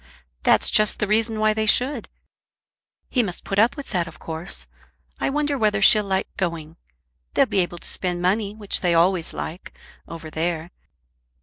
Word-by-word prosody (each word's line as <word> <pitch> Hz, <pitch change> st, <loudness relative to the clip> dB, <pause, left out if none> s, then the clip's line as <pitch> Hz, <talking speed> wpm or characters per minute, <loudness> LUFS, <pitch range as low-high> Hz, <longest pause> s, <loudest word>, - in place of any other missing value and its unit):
"That's -, -, +3 dB
just 215 Hz, 0 st, +4 dB
the -, -, 0 dB
reason 220 Hz, +2 st, +1 dB
why 215 Hz, 0 st, +3 dB
they 220 Hz, 0 st, -1 dB
should. 250 Hz, +3 st, +2 dB, 1.0 s
He 250 Hz, -, +1 dB
must 190 Hz, -6 st, -5 dB
put 195 Hz, -, -1 dB
up 230 Hz, +7 st, +3 dB
with 280 Hz, -, -7 dB
that 175 Hz, -4 st, 0 dB
of 160 Hz, -, -11 dB
course. 160 Hz, +2 st, -4 dB, 0.5 s
I -, -, 0 dB
wonder 290 Hz, 0 st, -1 dB
whether 210 Hz, -2 st, +2 dB
she'll 210 Hz, +1 st, +6 dB
like 190 Hz, -1 st, -2 dB
going. 165 Hz, -4 st, -3 dB, 0.6 s
They'll -, -, +5 dB
be 195 Hz, -, -1 dB
able 175 Hz, -1 st, -1 dB
to -, -, -9 dB
spend 180 Hz, -1 st, -3 dB
money, 200 Hz, +3 st, 0 dB
which 210 Hz, -2 st, -3 dB
they 175 Hz, -2 st, +2 dB
always 170 Hz, 0 st, +2 dB
like, 170 Hz, +4 st, -7 dB, 0.3 s
over 165 Hz, -1 st, -9 dB
there. 165 Hz, +1 st, -2 dB
195 Hz, 175 wpm, -23 LUFS, 170-215 Hz, 1.0 s, she'll